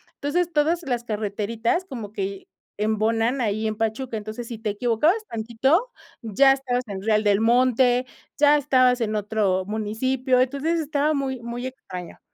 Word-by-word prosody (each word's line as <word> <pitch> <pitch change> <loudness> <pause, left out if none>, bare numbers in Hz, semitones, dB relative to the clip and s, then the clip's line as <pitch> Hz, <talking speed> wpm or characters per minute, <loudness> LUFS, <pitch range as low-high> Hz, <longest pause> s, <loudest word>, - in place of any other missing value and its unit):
entonces 345 +5 -1
todas 320 +3 +1
las 245 -4 -2
carreteritas 220 - -2
como 230 - -7
que 195 -1 -4 0.3
embonan 225 +4 +1
ahí 215 -1 0
en 215 - -2
Pachuca, 225 +2 -2
entonces 215 +2 -6
si 230 - -6
te 215 -2 -2
equivocabas 250 - +1
tantito, 265 - 0 0.3
ya 235 +5 +4
estabas 255 -2 -2
en 195 -2 -5
Real 215 0 +2
del 205 -1 +3
Monte, 245 +2 +3 0.3
ya 295 0 +6
estabas 255 -3 +3
en 215 -1 -1
otro 205 -3 0
municipio, 250 +5 0
entonces 280 +6 0
estaba 300 0 0
muy 265 -3 -2
muy 240 +2 -5
extraño. 180 -9 -9
235 Hz, 150 wpm, -24 LUFS, 215-270 Hz, 0.3 s, ya